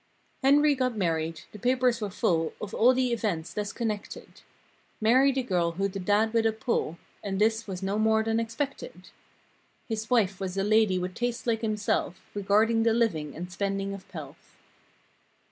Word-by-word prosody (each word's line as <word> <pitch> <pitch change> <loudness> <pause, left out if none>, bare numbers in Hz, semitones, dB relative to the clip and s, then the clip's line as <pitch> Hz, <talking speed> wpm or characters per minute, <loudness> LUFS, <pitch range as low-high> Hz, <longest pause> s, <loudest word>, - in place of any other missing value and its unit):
* - - -39
m - - +3
m 275 - +7
Henry 295 0 +4
got 255 -4 -1
married. 165 -3 -1
The 210 - -11
papers 250 0 +2
were 210 - -2
full 165 -3 0
Of 205 - -6
all 245 +3 +5
the 255 -1 +1
events, 180 -8 -2
thus 205 -1 -3
connected. 215 -3 -5 0.6
Married 260 +5 +4
a 260 - +1
girl 175 -6 0
who'd 195 +2 -2
a - - -2
dad 210 +4 +2
with 225 -1 +3
a - - +2
pull— 220 -6 -2 0.3
(And 195 -1 -2
this 220 +1 +2
was 190 -1 -5
no 200 +2 -1
more 220 0 +3
than 225 0 0
expected) 275 - -5 0.8
His 225 -1 -4
wife 205 -6 +2
was 190 -1 -4
a 195 - +1
lady 215 -2 +3
with 180 0 -3
tastes 240 +2 -3
like 225 -2 0
himself. 210 -4 -1
Regarding 210 +3 +2
the 225 0 +3
living 165 -11 0
and 180 +2 -6
spending 195 +2 -2
of 195 -1 -9
pelf. - - -11
215 Hz, 185 wpm, -27 LUFS, 190-230 Hz, 0.8 s, m